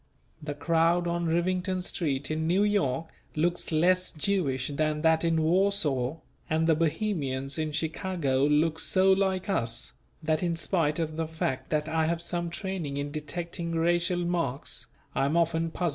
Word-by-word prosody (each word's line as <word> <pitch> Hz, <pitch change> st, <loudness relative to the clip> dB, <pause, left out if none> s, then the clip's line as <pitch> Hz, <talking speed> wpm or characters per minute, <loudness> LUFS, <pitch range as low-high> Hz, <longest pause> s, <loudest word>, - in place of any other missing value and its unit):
The 150 Hz, -1 st, -4 dB
crowd 165 Hz, +3 st, +2 dB
on 170 Hz, 0 st, -1 dB
Rivington 185 Hz, +3 st, 0 dB
Street 145 Hz, -6 st, -2 dB
in 160 Hz, +1 st, -1 dB
New 185 Hz, +4 st, +3 dB
York 165 Hz, -8 st, +1 dB, 0.3 s
looks 170 Hz, +3 st, 0 dB
less 180 Hz, +3 st, +3 dB
Jewish 150 Hz, -7 st, 0 dB
than 150 Hz, +1 st, -1 dB
that 160 Hz, 0 st, +4 dB
in 165 Hz, -1 st, +2 dB
Warsaw, 160 Hz, -7 st, +1 dB, 0.3 s
and 160 Hz, +1 st, +2 dB
the 165 Hz, -, +5 dB
Bohemians 150 Hz, -5 st, -1 dB
in 155 Hz, -1 st, -1 dB
Chicago 160 Hz, -3 st, -1 dB
look 155 Hz, +2 st, +2 dB
so 190 Hz, +1 st, +4 dB
like 190 Hz, 0 st, +1 dB
"us," 120 Hz, -, -1 dB, 0.3 s
that 155 Hz, 0 st, +1 dB
in 170 Hz, -2 st, 0 dB
spite 165 Hz, -2 st, +1 dB
of 160 Hz, -2 st, -2 dB
the 165 Hz, -1 st, -1 dB
fact 135 Hz, -5 st, -3 dB
that 155 Hz, 0 st, 0 dB
I 160 Hz, 0 st, +1 dB
have 170 Hz, 0 st, 0 dB
some 175 Hz, 0 st, -2 dB
training 170 Hz, -5 st, -4 dB
in 145 Hz, 0 st, -3 dB
detecting 170 Hz, +3 st, -4 dB
racial 175 Hz, +1 st, +1 dB
marks, 170 Hz, -6 st, -2 dB, 0.3 s
I 135 Hz, -, +1 dB
am 150 Hz, +4 st, +1 dB
often 165 Hz, 0 st, +1 dB
puzzled -, -, -16 dB
and -, -, -23 dB
mistaken. 175 Hz, -2 st, 0 dB
165 Hz, 170 wpm, -28 LUFS, 150-175 Hz, 0.3 s, the